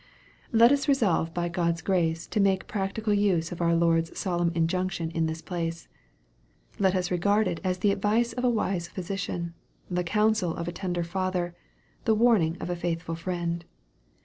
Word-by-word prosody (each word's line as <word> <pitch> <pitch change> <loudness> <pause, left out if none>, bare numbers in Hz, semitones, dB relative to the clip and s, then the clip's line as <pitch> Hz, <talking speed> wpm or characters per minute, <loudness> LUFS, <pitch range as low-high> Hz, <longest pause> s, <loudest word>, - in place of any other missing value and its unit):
Let 235 +1 +6
us 285 +1 +2
resolve 205 - +2
by 175 +1 -1
God's 170 -1 -1
grace 165 -4 +1
to - - -1
make 195 -1 +3
a - - -27
practical 210 +1 -1
use 190 -5 +2
of 175 - -5
our 170 0 +3
Lord's 165 0 +2
solemn 175 -2 0
injunction 170 0 0
in 165 -1 0
this 160 +1 -5
place. 165 -2 -4 0.9
Let 190 -1 +3
us 180 -1 -1
regard 200 +4 +2
it 175 -2 -2
as 185 -1 0
the 200 +2 +2
advice 215 +4 +1
of 250 - -4
a 250 - +4
wise 190 -7 0
physician, 180 -2 -4 0.4
the 180 0 0
counsel 210 -1 +1
of 170 - -4
a - - -1
tender 175 -1 -2
father, 180 0 -2 0.5
the 220 - +4
warning 210 -8 +3
of 180 - -4
a - - -1
faithful 170 -1 -3
friend. 170 0 -3
180 Hz, 175 wpm, -27 LUFS, 170-200 Hz, 0.9 s, Let